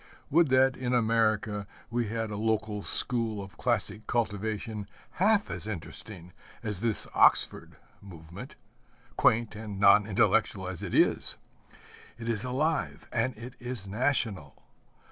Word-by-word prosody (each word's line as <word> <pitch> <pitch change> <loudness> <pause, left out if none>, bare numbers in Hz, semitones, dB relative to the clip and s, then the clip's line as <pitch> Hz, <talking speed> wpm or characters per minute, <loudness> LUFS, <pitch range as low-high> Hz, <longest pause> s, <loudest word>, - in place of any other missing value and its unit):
Would 165 +2 +5
that 130 0 +3
in 125 -1 -1
America 110 -3 +1 0.2
we 120 -1 -1
had 110 0 -3
a - - -4
local 110 -1 -1
school 115 -1 0
of 100 0 -10
classic 110 -2 -1
cultivation 110 -2 -3 0.3
half 210 +1 +3
as - - -6
interesting 90 -1 -7 0.3
as 105 -3 -2
this 115 -2 +4
Oxford - - +4 0.3
Movement 85 -3 -11 0.6
quaint 115 -1 +2
and 105 -2 -7
non 100 +1 +6
intellectual 105 -2 +1
as 95 -2 -6
it - - -4
is! - - +2 0.8
It 115 -1 -8
is 110 -2 0
alive 145 +5 -2
and 120 0 -1
it 120 +2 -9
is 120 -5 -6
national. 105 - -2
110 Hz, 130 wpm, -28 LUFS, 100-120 Hz, 0.8 s, non